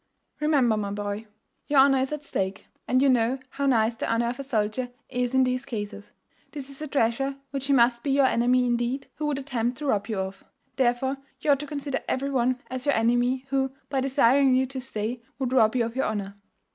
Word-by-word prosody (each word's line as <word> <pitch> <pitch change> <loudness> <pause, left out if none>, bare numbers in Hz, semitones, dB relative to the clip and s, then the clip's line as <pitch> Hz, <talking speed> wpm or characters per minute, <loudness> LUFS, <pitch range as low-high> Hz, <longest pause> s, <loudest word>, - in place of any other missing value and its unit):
Remember, 275 -7 +3
my 205 -1 -2
boy, 205 +1 -4 0.4
your 290 -2 +4
honour 270 -1 +5
is 265 +2 -1
at 300 -1 -4
stake; 190 -8 -3 0.2
and 255 +1 +3
you - - +5
know 250 0 +3
how 280 0 -1
nice 225 -3 +3
the - - -2
honour 235 +1 +1
of 245 - -5
a - - -3
soldier 245 -1 -1 0.2
is 250 0 -1
in 260 - +5
these 255 0 0
cases. 210 -5 -6 0.4
This 280 -2 -6
is 275 - -7
a 305 - -3
treasure 270 0 0 0.2
which 275 -1 -4
he 280 - +3
must 235 -2 +4
be 285 - -3
your 275 0 +4
enemy, 250 0 +3
indeed, 240 +2 -1
who 300 - -2
would 290 -2 0
attempt 245 -3 -2
to 300 - -6
rob 205 -7 +1
you 220 -3 -3
of. 190 +1 -4 0.3
Therefore, 260 +1 +1 0.2
you 295 - +2
ought 280 - +4
to 295 - -6
consider 285 -1 -3
every 275 +2 -1
one 255 -1 +1
as 255 +2 -5
your 285 - +4
enemy 245 +3 +2
who, 265 -1 0 0.2
by 270 -1 0
desiring 270 0 +4
you 260 +1 +3
to 260 0 -6
stay, 235 -1 -4 0.2
would 260 -2 -2
rob 220 -2 +4
you 240 -2 +2
of 230 +1 -6
your 265 - +1
honour. 200 -2 -3
255 Hz, 220 wpm, -26 LUFS, 230-275 Hz, 0.4 s, honour